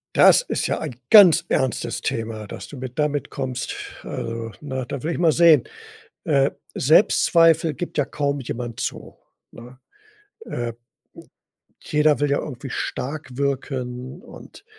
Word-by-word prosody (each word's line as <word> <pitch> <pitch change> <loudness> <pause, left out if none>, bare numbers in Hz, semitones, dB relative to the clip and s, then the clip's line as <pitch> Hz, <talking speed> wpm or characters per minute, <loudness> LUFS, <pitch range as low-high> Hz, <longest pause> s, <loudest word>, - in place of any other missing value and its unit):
Das - - +7
ist - - -2
ja - - -1
ein 145 -7 -5
ganz 175 -6 +8
ernstes 125 -2 -1
Thema, 110 -2 -4
dass - - -8
du 145 - -10
mir 130 0 -5
damit 150 +2 -2
kommst. 130 -3 -4 0.3
Also, 115 0 -5
ne? 130 -3 -4
Da 140 -3 -6
will 160 - -1
ich - - -3
mal 170 -2 +4
sehen. 160 -4 +5 0.6
Äh, 140 -3 +2 0.2
Selbstzweifel 165 +1 +4
gibt 175 - -6
ja 145 - +2
kaum 145 0 -2
jemand 120 -2 -6
zu, - - -5 0.3
ne? 125 +2 -13 0.7
Äh, 120 -1 -4 1.1
jeder 150 -1 +2
will 145 -1 +1
ja 140 - +2
irgendwie 135 -1 -7
stark 145 +4 -4
wirken 130 -2 -3
und - - -14
140 Hz, 140 wpm, -22 LUFS, 125-155 Hz, 1.1 s, ganz